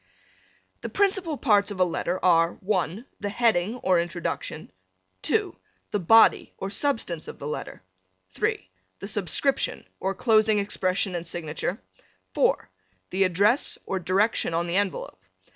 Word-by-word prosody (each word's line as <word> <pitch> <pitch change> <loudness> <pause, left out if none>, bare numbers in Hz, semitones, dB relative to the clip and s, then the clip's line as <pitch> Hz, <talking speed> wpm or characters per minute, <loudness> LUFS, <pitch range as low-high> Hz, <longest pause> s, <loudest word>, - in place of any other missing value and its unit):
The - - -5
principal 385 -6 +1
parts 205 -7 +3
of 200 -2 -7
a - - +6
letter 175 +1 -1
are 165 -1 +4
(1) 190 +2 -2
the 205 - -3
heading 220 -2 +1
or 185 -2 +4
introduction; 170 - -4 0.5
(2) - - 0 0.4
the 205 - 0
body 225 +6 +5
or 195 - -5
substance 200 - -1
of - - -8
the - - -8
letter; 150 -9 -6 0.5
(3) 95 - -2 0.3
the 195 - -7
subscription 210 +7 -1
or 190 +1 -2
closing 220 -2 +3
expression 195 -1 -1
and 175 -1 -4
signature; 170 +3 -3 0.5
(4) - - +2 0.4
the 190 +1 +3
address 200 +8 +2
or 190 - -2
direction 185 0 +1
on 170 +1 0
the 175 +2 0
envelope. 195 - -2
195 Hz, 140 wpm, -26 LUFS, 175-215 Hz, 0.5 s, a